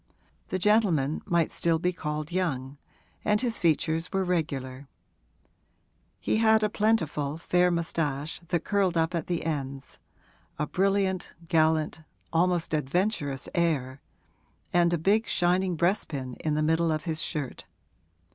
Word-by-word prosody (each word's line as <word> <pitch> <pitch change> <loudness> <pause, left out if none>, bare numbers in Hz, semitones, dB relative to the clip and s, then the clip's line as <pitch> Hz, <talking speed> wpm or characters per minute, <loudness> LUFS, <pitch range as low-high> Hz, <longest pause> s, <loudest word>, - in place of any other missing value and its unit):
The 185 - -2
gentleman 180 -8 +2
might 170 -2 +2
still 165 -1 +1
be 180 +2 0
called 150 -2 -4
young, 140 -7 -2 0.4
and 210 0 +2
his 235 -1 0
features 165 0 +1
were 195 0 +1
regular: 140 -7 -2 1.3
he - - 0
had 220 -1 +4
a 210 - +2
plentiful, 160 -10 0
fair 180 +2 +2
moustache 165 -3 -2
that 175 - 0
curled 195 -4 +1
up 165 +2 +1
at 170 -3 -2
the 175 -3 -1
ends, 135 -4 -4 0.6
a 150 - 0
brilliant, 190 0 0
gallant, 160 -1 +2 0.3
almost 175 0 +1
adventurous 150 -1 -1
air, 140 -6 0 0.7
and 175 -1 +4
a 175 - +2
big 205 +7 +2
shining 180 +1 +1
breastpin 150 -7 -1
in 155 -1 -1
the 155 - +1
middle 160 +1 +2
of 155 -1 -1
his 160 -2 -2
shirt. 145 -6 -4
165 Hz, 135 wpm, -27 LUFS, 150-180 Hz, 1.3 s, had